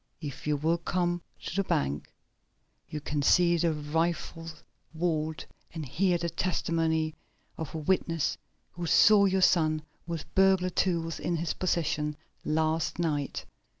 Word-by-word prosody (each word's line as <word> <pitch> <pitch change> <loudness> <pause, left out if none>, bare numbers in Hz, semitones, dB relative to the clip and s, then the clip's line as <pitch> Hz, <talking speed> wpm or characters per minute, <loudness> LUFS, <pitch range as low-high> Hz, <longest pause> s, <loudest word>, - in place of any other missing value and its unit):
"If 145 -2 -7
you 150 -1 +2
will 165 +4 +1
come 175 0 -1 0.2
to - - -5
the 195 - +2
bank 70 - -1 0.8
you 150 - -4
can 150 0 -2
see 175 +4 +4
the 170 0 +2
rifled 165 +1 -2 0.3
vault, 160 -2 -1 0.3
and 160 -2 -4
hear 175 +7 +1
the 170 0 -2
testimony 165 -3 0 0.4
of 160 -1 -6
a - - -1
witness 165 -1 0 0.4
who 175 -1 -5
saw 200 +7 +6
your 190 -1 +2
son 155 -4 +3 0.2
with 165 -3 -5
burglar 190 -1 +4
tools 165 -3 0
in 175 - -1
his 165 0 -1
possession 150 -4 -1 0.3
last 160 +1 0
night. 150 -5 -2
165 Hz, 140 wpm, -29 LUFS, 155-175 Hz, 0.8 s, saw